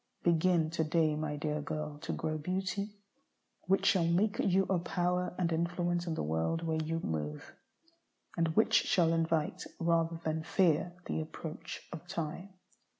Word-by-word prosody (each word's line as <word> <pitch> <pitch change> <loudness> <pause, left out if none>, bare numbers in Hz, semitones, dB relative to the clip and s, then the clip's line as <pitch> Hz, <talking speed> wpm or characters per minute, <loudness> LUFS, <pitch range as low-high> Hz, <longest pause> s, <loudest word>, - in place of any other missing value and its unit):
Begin 170 -1 +3
to 165 -1 0
day, 155 -1 +2
my 150 -1 -2
dear 150 0 -2
girl, 150 0 -4
to - - -4
grow 155 0 -2
beauty 195 +5 -2 0.7
which 195 +1 +3
shall 170 -3 +4
make 195 +5 +2
you 195 0 +3
a 190 -2 +1
power 180 +1 -1
and 175 -2 +1
an 160 - +1
influence 175 0 0
in 165 - -1
the - - -2
world 80 - 0
where 160 -1 0
you 165 +1 -1
move, 75 -2 -4 0.8
and 170 -1 +2
which 220 - +3
shall 165 -3 +4
invite, 165 -2 0 0.2
rather 165 0 +1
than 160 0 -1
fear, 170 0 +2
the - - -1
approach 160 +1 -7
of 170 +1 -8
time. 175 +1 -4
165 Hz, 160 wpm, -32 LUFS, 155-180 Hz, 0.8 s, shall